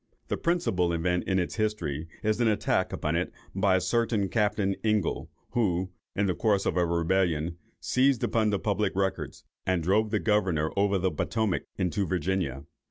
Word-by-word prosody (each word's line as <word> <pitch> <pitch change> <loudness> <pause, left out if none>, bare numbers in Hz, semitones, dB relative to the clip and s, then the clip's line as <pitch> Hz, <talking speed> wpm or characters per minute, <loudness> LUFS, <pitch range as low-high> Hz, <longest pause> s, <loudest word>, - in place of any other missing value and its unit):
The - - 0
principal 165 - +1
event 90 +2 0
in 95 - +1
its 90 +3 -1
history, 85 -9 -1 0.2
is 110 +2 +1
an 120 - +4
attack 105 -2 +1
upon - - -1
it - - -1 0.2
by 95 0 +3
a - - +3
certain 105 +1 +1
Captain 105 -3 +1
Ingle, 105 -5 0 0.2
who, 95 -5 0 0.2
in 100 - +1
the 95 - +1
course 100 0 +1
of - - 0
a 90 - +3
rebellion, 85 -1 0 0.2
seized 130 -1 +2
upon 110 -2 +2
the 100 - +1
public 100 0 0
records, 95 0 -2 0.2
and 90 -3 0
drove 105 +5 +2
the - - +1
governor 95 -8 +1
over 100 0 +2
the 95 0 0
Potomac 110 -5 -1
into 95 +1 0
Virginia. 85 -6 -1
95 Hz, 170 wpm, -28 LUFS, 90-105 Hz, 0.2 s, an